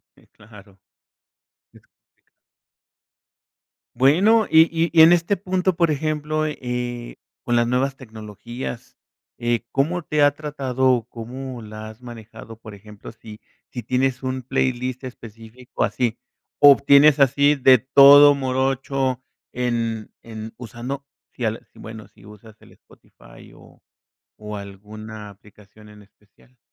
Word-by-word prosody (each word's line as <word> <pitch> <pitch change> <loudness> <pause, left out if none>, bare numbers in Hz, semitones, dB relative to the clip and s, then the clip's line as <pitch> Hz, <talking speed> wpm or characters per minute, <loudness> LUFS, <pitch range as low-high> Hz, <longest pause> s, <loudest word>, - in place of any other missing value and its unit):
Sí, - - -25
claro. 105 -3 -18 0.9
Es - - -19
complicado. - - -68 2.0
Bueno, 190 - +3
y 160 - +6
y 165 0 0
y 165 - +6
en 165 - +7
este 175 +3 +2
punto, 185 -1 -2
por 170 -2 +1
ejemplo, 155 +1 -2
eh, 125 -4 -6 0.3
con 120 -1 0
las 120 0 +1
nuevas 135 +2 -1
tecnologías, 115 +1 -9 0.4
eh, 120 -1 -2
¿cómo 160 +6 -1
te 150 -1 -1
ha 145 - +5
tratado 135 -4 -1
o 120 -2 -1
cómo 125 +2 -8
la 110 0 -9
has 110 +2 -15
manejado? 115 -2 -12
Por 110 -1 -13
ejemplo, 105 0 -13
si 110 -1 -14 0.3
si 120 - -7
tienes 130 0 -1
un 130 0 -4
playlist 130 0 -2
específico 115 0 -8
así, 120 -2 -2 0.4
¿obtienes 140 +1 +6
así 140 +2 +3
de 130 -2 +5
todo 140 +3 +7
morocho 130 -1 -2 0.3
en 115 -3 -3
en 110 -1 -9
usando 125 +4 -8 0.3
si 125 - -8
al 110 0 -3
si - - -23
bueno, 110 -2 -10
si 105 - -22
usas 105 +1 -15
el - - -19
Spotify - - -19
o - - -20 0.6
o 105 0 -8
alguna 105 +2 -10
aplicación 105 +1 -19
en 105 0 -16
especial? 105 +5 -28
125 Hz, 130 wpm, -21 LUFS, 110-140 Hz, 2.0 s, en